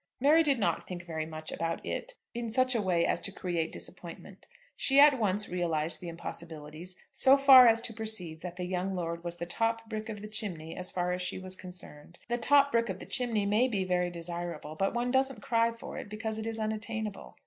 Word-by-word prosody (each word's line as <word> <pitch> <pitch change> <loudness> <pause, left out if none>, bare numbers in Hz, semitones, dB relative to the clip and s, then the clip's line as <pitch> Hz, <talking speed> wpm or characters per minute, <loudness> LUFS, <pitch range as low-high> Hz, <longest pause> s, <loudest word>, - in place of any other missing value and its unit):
Mary 300 +5 +5
did 285 -4 +2
not 210 - -1
think 175 -1 -6
very 160 -2 -4
much 155 0 -6
about 165 0 -3
"it" - - -4 0.2
in 235 -1 -4
such 255 +3 +3
a 230 - +1
way 175 -4 +1
as - - 0
to 195 - -1
create 175 -4 -2
disappointment. - - -8 0.3
She 275 +1 +4
at 285 -2 +7
once 205 -1 +1
realised 165 -3 0
the 175 - -7
impossibilities, 165 0 -6
so 270 +1 +5
far 265 -3 +9
as 230 0 +5
to 230 - -2
perceive 200 -8 -2
that 180 -1 -6
the 180 0 -4
young 185 +1 -2
lord 170 -1 -4
was 170 -1 -4
the 170 0 -5
top 225 +4 -1
brick 220 0 -5
of 210 -2 -5
the - - -5
chimney 190 -7 -3
as 180 0 -1
far 180 0 -1
as 180 0 -2
she 180 - -3
was 185 0 -6
concerned. 175 -3 -9
The 240 0 0
top 280 +3 +5
brick 230 -2 +1
of 190 - -3
the - - -10
chimney 235 -6 +1
may 215 +5 +3
be 205 -6 -1
very 180 -1 0
desirable, 170 -2 -5
but 195 +7 -1
one 245 +1 0
doesn't 265 -4 +1
cry 230 0 +2
for 230 0 -8
it, - - -8
because 220 +1 -3
it 220 - -3
is 225 0 -2
unattainable. 215 - -4
195 Hz, 220 wpm, -30 LUFS, 175-230 Hz, 0.3 s, far